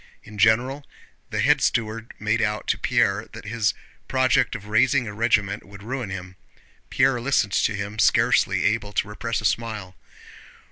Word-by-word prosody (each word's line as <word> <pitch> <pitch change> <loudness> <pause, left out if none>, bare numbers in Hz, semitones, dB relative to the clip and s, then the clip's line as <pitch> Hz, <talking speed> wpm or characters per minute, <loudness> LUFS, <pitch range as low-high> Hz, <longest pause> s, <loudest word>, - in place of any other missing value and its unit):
In 105 -1 -11
general 120 +7 +3 0.5
the - - -1
head - - +3
steward 115 0 -1
made 105 +2 0
out 105 -1 -1
to - - +2
Pierre - - +1
that - - -10
his 110 +1 0 0.3
project 130 -1 +2
of 100 - -7
raising 120 +4 +2
a 105 - -6
regiment 105 -2 0
would 100 0 -13
ruin 125 -1 -4
him. 95 -1 -7 0.5
Pierre 125 -3 +2
listened 115 -6 +1
to 105 - +1
him, 100 +2 -5
scarcely - - +3
able 105 -1 0
to 100 - 0
repress 110 +2 -3
a - - -5
smile. 105 -5 -2
110 Hz, 160 wpm, -24 LUFS, 105-120 Hz, 0.5 s, general